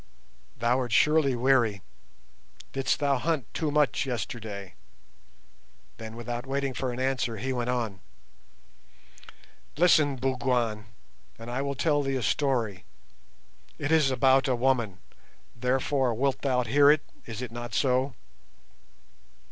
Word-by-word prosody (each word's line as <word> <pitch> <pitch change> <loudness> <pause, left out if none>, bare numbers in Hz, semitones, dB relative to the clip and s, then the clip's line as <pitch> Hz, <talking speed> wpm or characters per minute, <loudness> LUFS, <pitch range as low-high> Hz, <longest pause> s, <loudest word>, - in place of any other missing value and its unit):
Thou 120 +2 +2
art 125 -2 -3
surely 150 0 +3
weary. 120 -5 +2 0.9
Didst 135 -1 0
thou 140 -2 +1
hunt 155 -3 -1
too 155 - -1
much 145 -1 +1
yesterday?" 110 -5 -5 1.2
Then, 110 0 -8
without 120 +2 -5
waiting 135 0 -1
for 130 0 -2
an 120 - -6
answer, 130 -3 -1
he 130 +5 -2
went 125 -1 -2
on— 115 -6 -2 1.8
"Listen, 155 -4 +4
Bougwan, 125 -4 -1 0.5
and 115 +1 -8
I 130 +2 -1
will 140 0 -2
tell 145 +1 +1
thee 135 -1 -1
a 130 - -2
story; 115 -6 0 0.9
it 145 +1 -3
is 155 -4 +4
about 135 +1 +3
a 130 - +2
woman, 120 -6 0 0.6
therefore 130 +1 0
wilt 135 +3 0
thou 130 -3 +1
hear 140 +5 +5
it, 150 0 +4 0.2
is 115 +1 -5
it 125 - -6
not 120 -1 -6
so? 130 0 +1
130 Hz, 130 wpm, -27 LUFS, 120-140 Hz, 1.8 s, hear